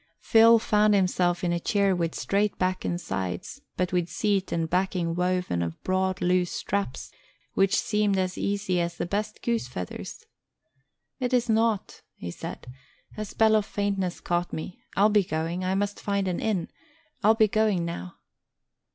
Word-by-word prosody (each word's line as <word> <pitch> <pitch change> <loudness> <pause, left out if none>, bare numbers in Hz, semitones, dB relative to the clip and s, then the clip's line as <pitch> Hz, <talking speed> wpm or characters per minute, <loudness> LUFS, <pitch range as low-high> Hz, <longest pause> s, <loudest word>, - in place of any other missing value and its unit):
Phil 230 +1 +6
found 210 -1 +3
himself 180 -2 +1
in 175 -1 +1
a 170 - 0
chair 200 +1 +2
with 170 -2 -1
straight 205 +1 0
back 185 0 0
and 175 - -1
sides, 95 - -4 0.2
but 180 0 -1
with 175 -1 +1
seat 195 +2 0
and 165 -1 0
backing 180 -1 0
woven 180 - 0
of 85 -1 -4
broad, 185 0 0
loose 180 0 +2
straps, 200 -9 -3 0.4
which 195 +2 +3
seemed 210 -3 +1
as 185 -1 0
easy 200 -3 -1
as 170 0 -3
the - - -2
best 210 +4 -3
goose 235 - 0
feathers. 90 -7 -7 0.9
"It 250 -1 +1
is 240 -1 +1
nought," 225 -2 +1
he 85 - -6
said. - - -7 0.5
"A 215 - -3
spell 220 +1 +3
of 215 -1 +1
faintness 195 -3 -2
caught 175 0 -1
me. 160 +3 -6 0.2
I'll 205 +2 +5
be 210 -1 +4
going; 165 +2 -2
I 185 +1 0
must 205 +1 -1
find 200 -1 0
an 180 - -1
inn; 200 -6 -1 0.5
I'll 220 +2 +6
be 220 -1 +5
going 210 -4 +1
now." 90 - -6
185 Hz, 170 wpm, -26 LUFS, 175-210 Hz, 0.9 s, Phil